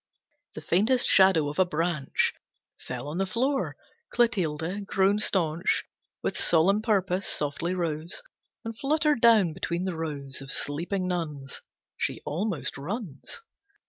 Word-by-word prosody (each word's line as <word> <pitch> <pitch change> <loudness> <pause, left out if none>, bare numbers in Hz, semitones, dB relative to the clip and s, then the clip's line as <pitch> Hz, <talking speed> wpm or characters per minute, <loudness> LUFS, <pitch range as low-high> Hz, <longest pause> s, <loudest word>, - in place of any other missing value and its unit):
The - - -6
faintest 220 +8 +3
shadow 190 -6 +5
of 145 +3 -4
a 185 - +6
branch 165 -4 0 0.5
Fell 125 +2 -6
on 155 +5 -4
the 195 - +1
floor. 265 +7 0 0.3
Clotilde, 190 -4 0
grown 195 +1 +3
staunch 170 -4 +1 0.4
With - - -1
solemn 185 +6 +4
purpose, 195 -4 +1
softly 155 +5 -1
rose 165 - -3 0.4
And 225 0 -4
fluttered 300 +1 +1
down 215 -8 +6
between 170 +3 -2
the 185 -3 -2
rows 140 -5 -5
Of 135 0 -5
sleeping 175 +6 -2
nuns. 150 -7 -3 0.4
She - - -1
almost 170 -1 -2
runs. 170 - -6
180 Hz, 130 wpm, -27 LUFS, 155-205 Hz, 0.5 s, a